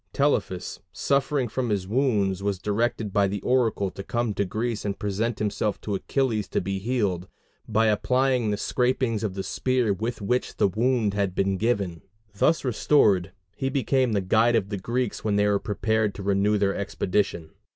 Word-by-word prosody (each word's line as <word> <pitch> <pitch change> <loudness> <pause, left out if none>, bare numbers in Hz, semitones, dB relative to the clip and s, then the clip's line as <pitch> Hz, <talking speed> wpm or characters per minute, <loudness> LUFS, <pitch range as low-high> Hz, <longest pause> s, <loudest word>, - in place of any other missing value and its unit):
Telephus, 140 -10 0
suffering 140 -1 0
from 125 +2 -2
his 100 -3 -1
wounds, 105 -6 +1
was 100 -1 -1
directed 105 +1 -1
by 100 -1 +3
the 100 +1 -3
oracle 115 -6 +1
to 95 - -7
come 120 +2 -1
to 100 - 0
Greece 110 +3 -2
and 100 -1 -2
present 105 +2 -1
himself 105 0 -1
to 105 - -3
Achilles 110 +1 0
to - - -1
be 95 +1 -3
healed, 100 -5 -1 0.4
by 110 0 +2
applying 125 +2 +2
the 105 - 0
scrapings 125 0 0
of 100 -3 -2
the 95 - -3
spear 125 +1 0
with 115 +5 -3
which 125 +5 -1
the - - +4
wound 110 +1 +1
had 100 -3 -1
been 95 0 +1
given; 100 -6 -1 0.3
thus 155 +10 +2
restored, 105 -7 +3 0.2
he 135 - -1
became 130 -3 +1
the 100 - +1
guide 110 +5 +3
of 100 -4 0
the 100 - -3
Greeks 120 +3 -2
when 105 -2 +1
they 105 0 +3
were 100 -1 +2
prepared 110 +1 0
to 100 - -7
renew 100 +2 +2
their 100 -1 +1
expedition. 100 -4 -1
105 Hz, 180 wpm, -25 LUFS, 100-120 Hz, 0.4 s, the